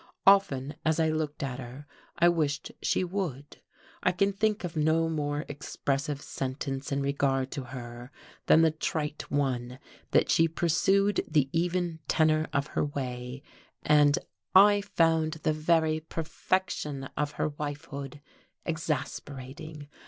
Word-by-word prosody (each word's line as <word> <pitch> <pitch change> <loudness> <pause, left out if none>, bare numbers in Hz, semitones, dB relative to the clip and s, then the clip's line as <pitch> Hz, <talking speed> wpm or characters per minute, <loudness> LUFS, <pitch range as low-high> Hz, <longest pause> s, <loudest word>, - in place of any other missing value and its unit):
Often, 145 -8 +4
as 160 0 +2
I 160 -1 +3
looked 155 -2 -2
at 130 -1 -3
her, 130 +3 -9 0.3
I 170 - +5
wished 155 -5 0
she - - +1
would. 170 -7 -4 0.4
I 185 - +3
can 195 +2 +1
think 215 +1 0
of 175 -1 -4
no 160 +1 +2
more 150 -2 -2
expressive 140 0 -3
sentence 135 +1 -4
in 140 0 0
regard 135 -1 0
to 135 - -4
her 120 0 -8 0.4
than 160 - +7
the 160 - +5
trite 155 -1 -3
one 125 -3 -1 0.3
that - - +3
she 165 - +5
pursued 190 +5 +2
the 150 -4 +2
even 175 0 0
tenor 155 0 +3
of 140 0 0
her - - +1
way; 130 -2 -5 0.4
and 145 -1 +5 0.4
I 205 +1 +8
found 160 -4 +2
the 155 -1 -1
very 155 0 +2
perfection 160 -3 -2
of 150 0 -1
her - - 0
wifehood 145 -1 -6 0.4
exasperating. 150 -2 -4
150 Hz, 135 wpm, -29 LUFS, 140-165 Hz, 0.4 s, I